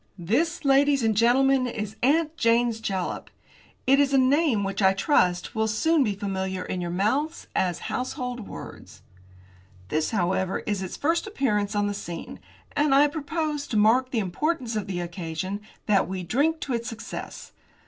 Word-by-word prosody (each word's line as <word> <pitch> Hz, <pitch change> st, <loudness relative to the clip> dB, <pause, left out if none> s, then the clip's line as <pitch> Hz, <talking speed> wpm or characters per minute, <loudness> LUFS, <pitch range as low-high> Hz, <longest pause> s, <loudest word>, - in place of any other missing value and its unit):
"This, 285 Hz, -, 0 dB
ladies 275 Hz, -1 st, +4 dB
and 220 Hz, -1 st, +2 dB
gentlemen, 255 Hz, +3 st, +4 dB
is 215 Hz, -3 st, -5 dB
'Aunt 310 Hz, +4 st, +2 dB
Jane's 230 Hz, -3 st, +2 dB
Jalap.' 190 Hz, -4 st, -3 dB, 0.6 s
It 275 Hz, +2 st, +5 dB
is 280 Hz, -1 st, +3 dB
a -, -, +6 dB
name 265 Hz, -4 st, +3 dB
which 195 Hz, +1 st, -2 dB
I 190 Hz, 0 st, +5 dB
trust 180 Hz, -, +1 dB
will 220 Hz, 0 st, 0 dB
soon 305 Hz, +8 st, +2 dB
be 210 Hz, -5 st, -1 dB
familiar 190 Hz, -2 st, -3 dB
in 180 Hz, -, -3 dB
your 175 Hz, -, -3 dB
mouths 220 Hz, -, -1 dB
as 180 Hz, -3 st, +1 dB
household 250 Hz, -3 st, -4 dB
words. -, -, -10 dB, 0.9 s
This, 155 Hz, 0 st, 0 dB
however, 190 Hz, -2 st, 0 dB
is 205 Hz, -2 st, -1 dB
its 185 Hz, -, -5 dB
first 335 Hz, +7 st, 0 dB
appearance 210 Hz, -, 0 dB
on 205 Hz, 0 st, +2 dB
the 205 Hz, -, -1 dB
scene, 175 Hz, -4 st, -7 dB, 0.4 s
and 290 Hz, -2 st, +3 dB
I 285 Hz, +2 st, +7 dB
propose, 300 Hz, -1 st, -3 dB
to 220 Hz, -, -1 dB
mark 235 Hz, +5 st, +4 dB
the 255 Hz, -, -3 dB
importance 235 Hz, -, -1 dB
of 210 Hz, -, -2 dB
the 180 Hz, -2 st, -3 dB
occasion, 175 Hz, +2 st, -4 dB, 0.2 s
that 205 Hz, -2 st, +3 dB
we 185 Hz, -1 st, -4 dB
drink 295 Hz, -, +1 dB
to 270 Hz, -, -3 dB
its 235 Hz, 0 st, -2 dB
success. 225 Hz, -1 st, -8 dB
230 Hz, 170 wpm, -25 LUFS, 195-275 Hz, 0.9 s, I